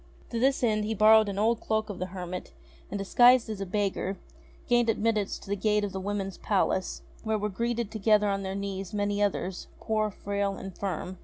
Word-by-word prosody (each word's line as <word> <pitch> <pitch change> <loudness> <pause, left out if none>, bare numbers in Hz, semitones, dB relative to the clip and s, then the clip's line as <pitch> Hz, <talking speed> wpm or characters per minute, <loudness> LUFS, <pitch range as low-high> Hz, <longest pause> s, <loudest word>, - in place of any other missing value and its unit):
To 230 - -1
this 265 +2 +2
end 215 -2 +2
he 220 +1 -2
borrowed 215 +1 +6
an 195 - -4
old 225 +2 +2
cloak 220 0 0
of 190 - -8
the 185 - -2
hermit, 180 -1 -6 0.4
and, 205 - -3
disguised 240 +4 +5
as 205 -2 -5
a 195 - -3
beggar, 195 -1 -1 0.5
gained 240 -1 +3
admittance 215 -2 0
to - - -15
the 200 - 0
gate 210 +1 +1
of 205 - -2
the 190 - -4
Women's 195 -1 -3
Palace, 190 -2 0 0.2
where 220 -1 0
were 210 0 -2
gathered 235 +1 -2
together 210 -1 +3
on 195 0 0
their 190 0 -4
knees 195 -1 -4
many 205 0 0
others, 190 -2 -1
poor, 215 -1 0
frail, 200 0 -2
infirm. 190 -1 -5
205 Hz, 200 wpm, -28 LUFS, 195-220 Hz, 0.5 s, borrowed